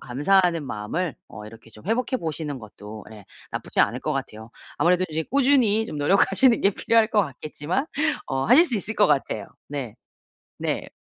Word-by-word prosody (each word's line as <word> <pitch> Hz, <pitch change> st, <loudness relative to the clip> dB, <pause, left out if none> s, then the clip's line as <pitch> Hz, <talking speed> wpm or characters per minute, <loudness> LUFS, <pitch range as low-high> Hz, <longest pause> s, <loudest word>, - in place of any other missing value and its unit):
감사하는 170 Hz, +5 st, +2 dB
마음을 135 Hz, +9 st, -3 dB
어 105 Hz, -, -10 dB
이렇게 115 Hz, +1 st, -13 dB
좀 110 Hz, +4 st, -15 dB
회복해 240 Hz, +4 st, 0 dB
보시는 155 Hz, -, -4 dB
것도 105 Hz, -1 st, -11 dB
예 105 Hz, -3 st, -13 dB, 0.2 s
나쁘지 -, -, -6 dB
않을 -, -, +1 dB
것 -, -, -2 dB
같아요. 110 Hz, +1 st, -6 dB, 0.3 s
아무래도 180 Hz, +1 st, +3 dB
인제 160 Hz, 0 st, -2 dB
꾸준히 250 Hz, -6 st, +3 dB
좀 150 Hz, -, -6 dB
노력하시는 210 Hz, -, +3 dB
게 200 Hz, -, +4 dB
필요할 225 Hz, +2 st, +2 dB
것 215 Hz, -4 st, +3 dB
같겠지만 155 Hz, -, -3 dB, 0.4 s
어 135 Hz, 0 st, -1 dB
하실 265 Hz, +10 st, +7 dB
수 260 Hz, -9 st, 0 dB
있을 215 Hz, +2 st, -3 dB
것 205 Hz, -, +4 dB
같아요. 135 Hz, -8 st, 0 dB, 0.2 s
네. 130 Hz, -6 st, -6 dB, 0.6 s
네. -, -, -3 dB
160 Hz, 360 characters per minute, -24 LUFS, -, 0.6 s, 하실